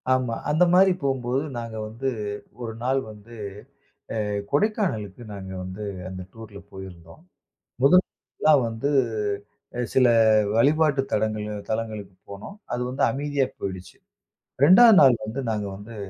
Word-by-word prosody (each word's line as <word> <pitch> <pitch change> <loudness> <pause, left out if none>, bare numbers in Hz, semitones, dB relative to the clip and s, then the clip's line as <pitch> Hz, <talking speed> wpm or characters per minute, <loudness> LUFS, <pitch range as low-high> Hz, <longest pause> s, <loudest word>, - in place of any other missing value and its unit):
ஆமா, 130 -3 +1
அந்த 155 +4 +3
மாரி 190 +1 +6
போம்போது 135 -1 -1 0.2
நாங்க 115 -1 -6
வந்து 115 +5 -3 0.5
ஒரு 115 -2 -5
நாள் 135 +2 +1
வந்து, 110 +2 -13 0.9
அ - - -1 0.3
கொடைக்கானலுக்கு 145 - -1
நாங்க 95 -2 -8
வந்து 95 +3 -7 0.2
அந்த 95 0 -7
டூர்ல 110 -3 -11
போயிருந்தோம். 95 - -11 0.6
முதல் 180 +7 +6
நாள்லாம் 150 -4 +1
வந்து 115 +5 -2 1.0
சில 130 -1 +5 0.5
வழிபாட்டு 145 +3 +3
தலங்கள் 110 0 -1 0.2
தலங்களுக்கு 110 -3 -4 0.2
போனோம். 100 - -9 0.2
அது 120 - -2
வந்து 130 +2 -3
அமைதியா 140 +1 -1
போயிடுச்சு. 95 -2 -6 0.7
2ஆவது 205 +8 +8
நாள் 130 -3 +7
வந்து 110 +5 -5
நாங்க 105 -2 -2
வந்து 105 +4 -11
115 Hz, 125 wpm, -24 LUFS, 105-140 Hz, 1.0 s, 2ஆவது